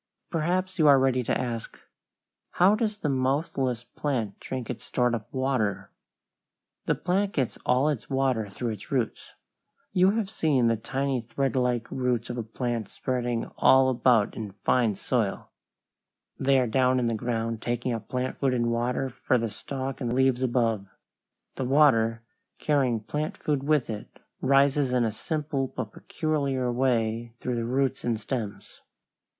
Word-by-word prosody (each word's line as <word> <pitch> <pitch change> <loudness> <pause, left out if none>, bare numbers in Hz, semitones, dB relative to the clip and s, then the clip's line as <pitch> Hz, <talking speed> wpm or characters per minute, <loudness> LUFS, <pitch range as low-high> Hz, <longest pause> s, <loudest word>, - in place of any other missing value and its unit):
Perhaps 185 +3 -1
you 155 - +5
are 140 -1 +8
ready 130 -1 +2
to 120 - 0
ask, 120 -3 -4 0.8
"How 185 +3 +5
does 215 -1 0
the 160 - -2
mouthless 130 -2 0
plant 120 -5 -3
drink 130 -3 -5
its 125 - -5
stored 125 -1 +1
up 110 -3 -4
water?" 130 -6 -1 1.0
The - - +3
plant 195 +3 0
gets 130 -5 -1
all 125 +4 +3
its 145 -6 -2
water 130 -6 0
through 115 +4 -3
its 105 -2 -9
roots. 125 -5 -2 0.6
You 185 0 +5
have 220 -3 0
seen 150 - +1
the 115 0 +3
tiny 135 +3 -2
threadlike 125 0 0
roots 125 -2 -1
of 120 - -4
a - - 0
plant 115 0 -3
spreading 120 -2 -2
all 130 0 +6
about 120 -3 +3
in 105 -3 -6
fine 115 -5 +3
soil; - - -2 0.9
they 135 0 +3
are 125 - +2
down 130 +2 +2
in 125 - +1
the 115 - +1
ground 115 0 -2
taking 120 +1 -1
up 115 -2 -6
plant 125 0 -2
food 135 -2 +2
and 120 -1 +1
water 120 +3 0
for 130 0 0
the 115 -2 -2
stalk 135 +2 -5
and 120 -2 -1
leaves 130 -1 +2
above. 115 -5 +1 0.7
The 130 - -1
water, 115 -5 +4 0.3
carrying 130 -7 +1
plant 155 - -3
food 145 -3 -1
with 150 -3 +2
it, 105 -2 -7 0.2
rises 135 0 +3
in 125 -1 +3
a 110 - +1
simple 145 +3 -2
but 110 -3 -5
peculiar 140 -5 -1
way 120 -2 0
through 125 - -2
the 115 - -1
roots 130 +2 0
and 115 -2 0
stems. 110 -2 -5
125 Hz, 160 wpm, -27 LUFS, 115-135 Hz, 1.0 s, are